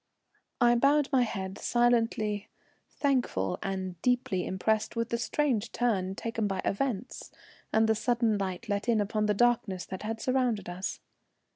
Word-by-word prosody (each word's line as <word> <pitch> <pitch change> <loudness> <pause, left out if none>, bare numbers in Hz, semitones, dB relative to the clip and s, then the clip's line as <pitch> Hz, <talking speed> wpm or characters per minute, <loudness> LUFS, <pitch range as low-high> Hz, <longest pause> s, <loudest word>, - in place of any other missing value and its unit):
I 240 -1 +5
bowed 275 +4 +3
my 265 -2 +4
head 190 -5 -3
silently, 230 -4 +1 0.4
thankful 250 - 0
and 185 -3 -4
deeply 245 -7 +1
impressed 215 +4 0
with 230 0 -1
the 235 - -1
strange 235 -3 0
turn 195 -6 0
taken 225 -1 -2
by 195 -1 -2
events 235 0 -2 0.4
and 220 0 +3
the 220 - +4
sudden 230 -1 +1
light 190 +3 -4
let 205 +2 -1
in 225 -2 +3
upon 210 +1 0
the 210 - +2
darkness 225 -5 +1
that 190 - -7
had 220 +1 -4
surrounded 250 -5 0
us. 180 +2 -4
220 Hz, 150 wpm, -29 LUFS, 195-240 Hz, 0.4 s, I